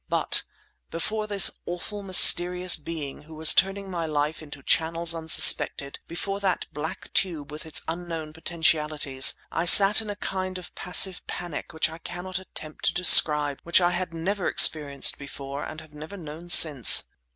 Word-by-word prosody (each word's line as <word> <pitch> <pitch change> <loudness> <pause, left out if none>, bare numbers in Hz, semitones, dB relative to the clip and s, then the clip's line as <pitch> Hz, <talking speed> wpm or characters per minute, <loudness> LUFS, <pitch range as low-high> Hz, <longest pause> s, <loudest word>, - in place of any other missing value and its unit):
But - - 0 0.5
before 215 +6 -4
this 200 -3 +2 0.2
awful, 190 +4 -7
mysterious 180 -1 +4
being 150 -3 -9
who 155 +1 -15
was 155 0 +2
turning 195 0 -1
my 170 -2 -5
life 150 +1 -4
into 145 -3 -13
channels 165 +2 0
unsuspected, 160 -3 +1
before 195 +4 -6
that 190 -3 -3
black 150 +2 -8
tube 160 -6 -4
with 155 +2 -10
its 155 - -4
unknown 165 -2 -7
potentialities, 155 -4 -1 0.2
I 165 - -3
sat 200 +4 +7
in 215 - -9
a 205 - -6
kind 185 -1 -6
of 180 - -12
passive 180 +1 +3
panic 175 -1 -8
which 160 -1 -1
I 160 +1 -12
cannot 180 +2 -8
attempt 155 -4 -9
to - - -1
describe, 150 -5 +5
which 170 +1 +1
I 175 -1 0
had 180 -1 -5
never 180 +4 -4
experienced 140 -3 +1
before 140 0 -9
and 155 - -9
have 155 -1 -19
never 155 +7 -11
known 165 0 -12
since. 145 -8 +5
165 Hz, 160 wpm, -23 LUFS, 155-180 Hz, 0.5 s, sat